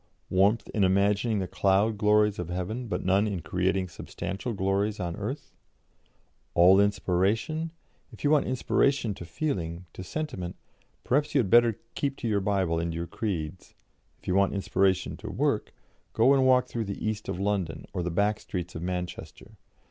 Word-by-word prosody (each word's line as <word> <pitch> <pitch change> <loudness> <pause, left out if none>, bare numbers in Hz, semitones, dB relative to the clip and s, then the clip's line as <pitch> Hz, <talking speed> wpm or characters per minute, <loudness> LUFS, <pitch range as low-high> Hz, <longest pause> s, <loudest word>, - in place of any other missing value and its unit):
Warmth 100 +5 +3
in 105 - +1
imagining 100 +4 +2
the 95 -2 -2
cloud 100 +4 +2
glories 105 -1 +3
of 90 -1 -4
heaven, 95 +8 -3
but - - -3
none 95 +3 +3
in 95 -5 -3
creating 95 +2 0
substantial 95 +5 -5
glories 100 +2 0
on 85 -2 -3
earth?' - - -5 1.0
All 90 +3 +7
inspiration'? 100 - +1 0.4
If - - -13
you 145 - +3
want 150 -2 +3
inspiration 130 -2 +1
to 90 - -9
feeling, 85 - -3
to 95 - -7
sentiment, 95 - -4 0.5
perhaps 145 +4 +1
you - - +6
had 100 -7 0
better 120 -2 +5 0.2
keep 140 -1 -2
to 120 - -4
your 105 -2 +1
Bible 95 -4 +1
and 85 0 -2
your 85 +1 -3
creeds; 90 -4 -4 0.4
if - - -21
you 90 - +1
want 100 +1 +2
inspiration 95 -1 +1
to - - -7
work, - - 0 0.4
go 120 +5 +5
and 135 -1 +4
walk 125 -1 +5
through 115 -3 -4
the 100 +1 -5
East 110 0 -3
of 90 - -3
London, 100 -4 -1
or 90 - -2
the 90 - -2
back 105 +5 +1
streets 90 -1 -5
of 80 - -6
Manchester. 90 0 -5
100 Hz, 170 wpm, -27 LUFS, 90-110 Hz, 1.0 s, All